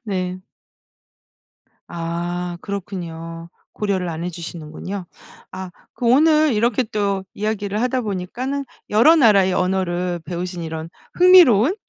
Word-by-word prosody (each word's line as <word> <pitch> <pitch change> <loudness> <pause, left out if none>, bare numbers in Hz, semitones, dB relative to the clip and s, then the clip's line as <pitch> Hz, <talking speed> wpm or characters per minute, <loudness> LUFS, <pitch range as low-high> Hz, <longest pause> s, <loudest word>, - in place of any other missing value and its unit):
네. 185 -2 -3 1.5
아. 175 +1 -4
그렇군요. 170 -4 -6 0.2
고려를 190 -4 -1
안 165 +1 -5
해주시는군요. 175 +2 -6 0.5
아 185 -1 -7 0.2
그 245 - -4
오늘 305 +2 +5
이렇게 230 +3 +2
또 200 -3 -2
이야기를 210 0 -2
하다 255 +1 +1
보니까는 235 +7 -3 0.3
여러 295 +11 +6
나라의 200 -8 +5
언어를 180 -1 -1
배우신 175 +1 -4
이런 160 0 -5 0.3
흥미로운 350 - +6
190 Hz, 255 characters per minute, -21 LUFS, 175-220 Hz, 1.5 s, 여러